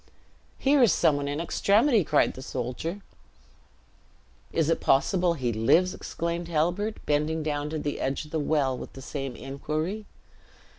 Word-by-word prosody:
"Here 275 +1 +3
is 235 -6 +6
some 155 - +3
one 140 0 -3
in 145 +1 -2
extremity!" 210 - +3
cried 150 -1 +2
the 130 - -9
soldier. 130 +9 -4 1.5
"Is 165 -3 +1
it 165 - +2
possible 175 +5 +2
he 125 -5 -1
lives!" 165 +12 +3
exclaimed 170 0 -4
Halbert, 175 +7 0
bending 150 +2 0
down 145 -1 -2
to 155 - -3
the 145 -1 -3
edge 135 +3 -2
of 150 - -15
the 160 - -1
well 145 -3 +1
with - - -8
the 135 - -10
same 135 -3 -5
inquiry. 155 - -4
155 Hz, 155 wpm, -27 LUFS, 140-175 Hz, 1.5 s, is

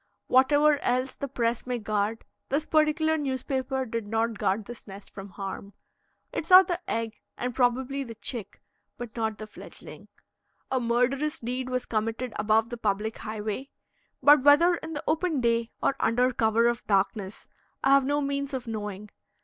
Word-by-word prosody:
Whatever 290 +3 +4
else 255 +1 0
the 280 - -5
press 235 -2 -1
may 250 -1 -1
guard, 215 0 -2 0.2
this 290 +3 0
particular 315 0 +2
newspaper 265 -1 -2
did 230 -2 -4
not 225 0 -1
guard 200 +3 0
this 240 0 -10
nest 195 0 -11
from 195 0 -8
harm. 195 +1 -7 0.6
It 325 - -3
saw 370 +1 +10
the 350 -2 -3
egg 225 -1 -3 0.2
and 250 0 -3
probably 260 +3 +1
the 230 -3 -9
chick, 225 -1 -5 0.3
but 240 -3 -8
not 220 -2 -1
the 215 - -7
fledgeling. 215 - -12 0.6
A 260 - +2
murderous 250 +5 +1
deed 250 +2 -3
was 255 -1 -2
committed 225 +2 -2
above 220 +1 +2
the 240 - -5
public 215 0 -1
highway, 215 +5 -4 0.5
but 290 -1 +7
whether 290 +6 +6
in 320 0 -7
the 295 - -4
open 320 -1 0
day 235 -1 +1
or - - +2
under 250 +2 +2
cover 225 +1 +3
of 240 -1 -1
darkness 195 0 -1 0.4
I 270 - +4
have 275 0 +6
no 290 +2 0
means 280 -1 -2
of 255 - -5
knowing. 210 -2 -6
245 Hz, 165 wpm, -27 LUFS, 220-275 Hz, 0.6 s, saw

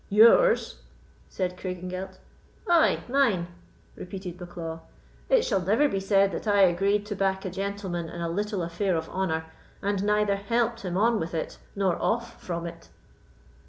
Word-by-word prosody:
"Yours?" 235 - +5 0.5
said 180 -1 -2
Craigengelt. 185 +1 -5 0.5
"Ay, 340 -2 +4
mine," 240 -10 +2 0.5
repeated 185 -1 -7
Bucklaw; 170 -2 -7 0.5
"it - - +4
shall 195 -5 +1
never 220 +11 +3
be 195 - -1
said 195 0 +3
that 190 - -5
I 205 -1 +4
agreed 195 +3 +3
to 210 0 -4
back 190 0 0
a 185 - -3
gentleman 190 -3 -3
in 170 - -8
a 170 - -2
little 200 +2 -2
affair 175 +3 -1
of 160 0 -4
honour, 160 -4 -1 0.3
and 200 -1 -1
neither 210 -1 +2
helped 230 +3 0
him 180 -2 -3
on 225 +2 +3
with 165 +1 -4
it 160 - -4 0.2
nor 195 -3 0
off 235 +1 -1
from 170 -1 -4
it." 170 - -9
195 Hz, 160 wpm, -27 LUFS, 175-210 Hz, 0.5 s, Yours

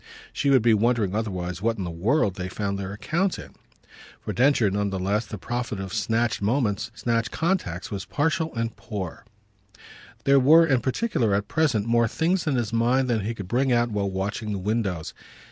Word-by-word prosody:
She 140 - 0
would 130 -4 +5
be 115 -1 +5
wondering 110 -2 +2
otherwise 90 -5 -3
what 115 +1 0
in 100 - -3
the 85 - -4
world 100 - +1
they 95 -1 -5
found 100 0 -3
their 95 0 -4
account 170 - -1
in. - - -10 0.7
For - - -5
Densher, 125 -5 +3
none 100 +1 0
the 95 - -3
less, 100 +4 -1
the 105 - -6
profit 120 -1 -4
of 95 0 -6
snatched 115 +1 0
moments, 105 -1 0
snatched 115 -1 0
contacts, 160 - -2
was 100 -1 -4
partial 160 +7 0
and 115 0 -2
poor; 95 -6 -6 1.0
there 140 0 +5
were 160 +6 +7
in 135 -6 +2
particular 130 - 0
at 100 0 -1
present 135 -10 +1
more 115 0 +3
things 170 - 0
in 145 - +2
his 115 -2 -1
mind 125 +3 +2
than 115 - +1
he 110 +3 -3
could 100 -4 -7
bring 130 +6 +1
out 120 -1 +2
while 100 -2 -1
watching 100 +3 -3
the - - -2
windows. 95 -4 -2
115 Hz, 195 wpm, -25 LUFS, 100-130 Hz, 1.0 s, were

